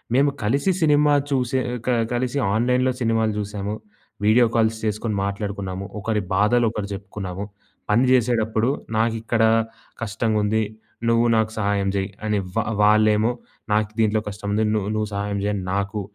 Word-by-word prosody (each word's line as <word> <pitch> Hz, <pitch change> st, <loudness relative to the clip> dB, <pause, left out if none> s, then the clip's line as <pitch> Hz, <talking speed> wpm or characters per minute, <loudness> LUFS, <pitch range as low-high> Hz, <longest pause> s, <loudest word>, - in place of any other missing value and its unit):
మేము 140 Hz, +2 st, +4 dB
కలిసి 140 Hz, -, +1 dB
సినిమా 150 Hz, -2 st, +4 dB, 0.2 s
చూసే 130 Hz, -2 st, 0 dB, 0.3 s
క -, -, -1 dB, 0.2 s
కలిసి 125 Hz, +3 st, -1 dB, 0.2 s
ఆన్‌లైన్‌లో 125 Hz, +3 st, +2 dB
సినిమాలు 115 Hz, -2 st, +2 dB
జూసాము, 105 Hz, 0 st, -3 dB, 0.5 s
వీడియో 115 Hz, +3 st, +5 dB
కాల్స్ 110 Hz, -1 st, +2 dB
చేసుకొని 105 Hz, 0 st, -1 dB
మాట్లాడుకున్నాము, 100 Hz, -1 st, -4 dB
ఒకరి 105 Hz, 0 st, -1 dB
బాధలు 105 Hz, +5 st, +3 dB
ఒకరు 105 Hz, -3 st, -4 dB
జెప్పుకున్నాము, 95 Hz, -1 st, -6 dB, 0.5 s
పని 115 Hz, +4 st, +4 dB
జేసేటప్పుడు 115 Hz, -2 st, +2 dB, 0.3 s
నాకిక్కడ 115 Hz, 0 st, +1 dB, 0.6 s
కష్టగుంది. 110 Hz, 0 st, 0 dB, 0.5 s
నువ్వు 115 Hz, 0 st, +3 dB
నాకు 110 Hz, 0 st, +1 dB
సహాయం 100 Hz, -1 st, +1 dB
జేయి 95 Hz, +1 st, -1 dB, 0.2 s
అని, 105 Hz, -1 st, +1 dB, 0.2 s
వా 115 Hz, -, +2 dB, 0.2 s
వాళ్ళేమో 110 Hz, +2 st, +4 dB, 0.4 s
నాకు 105 Hz, 0 st, +1 dB
దీంట్లో 110 Hz, 0 st, +2 dB
కష్టం 100 Hz, 0 st, -5 dB
ను -, -, +3 dB, 0.3 s
నువ్వు 110 Hz, 0 st, -1 dB
సహాయం 100 Hz, 0 st, -2 dB
జేయని 105 Hz, -2 st, -1 dB
నాకు 100 Hz, +1 st, -2 dB
110 Hz, 135 wpm, -22 LUFS, 105-115 Hz, 0.6 s, వీడియో